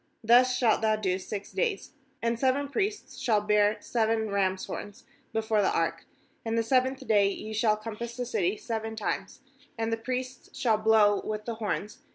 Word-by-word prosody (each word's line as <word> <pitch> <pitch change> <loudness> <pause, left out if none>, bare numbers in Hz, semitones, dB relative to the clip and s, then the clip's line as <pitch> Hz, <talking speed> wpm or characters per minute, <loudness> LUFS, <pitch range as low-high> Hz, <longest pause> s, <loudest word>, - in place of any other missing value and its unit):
Thus 250 +3 +5
shalt 230 -4 +3
thou 220 -1 +3
do 190 -3 -1
six 200 +1 -6
days. 465 -5 -1 0.3
4And 230 0 0
seven 275 +2 +1
priests 410 +6 -3
shall 235 -6 +2
bear 210 0 +2
seven 220 -2 0
rams' 190 -1 0
horns 205 -1 -8 0.3
before 220 -1 +1
the 195 - +3
ark; - - -1 0.4
and 225 0 -1
the 230 - +2
seventh 260 +2 +1
day 205 -2 +4
ye 215 +2 -6
shall 215 0 +2
compass 230 +2 -6
the 250 - -2
city 200 -4 0
seven 225 -1 -4
times, 205 +2 -4 0.4
and 225 0 -1
the - - 0
priests 255 +2 -5
shall 225 -4 +2
blow 215 -2 +4
with 215 0 -4
the 235 - -3
horns. 210 -1 -4
220 Hz, 180 wpm, -28 LUFS, 210-240 Hz, 0.4 s, Thus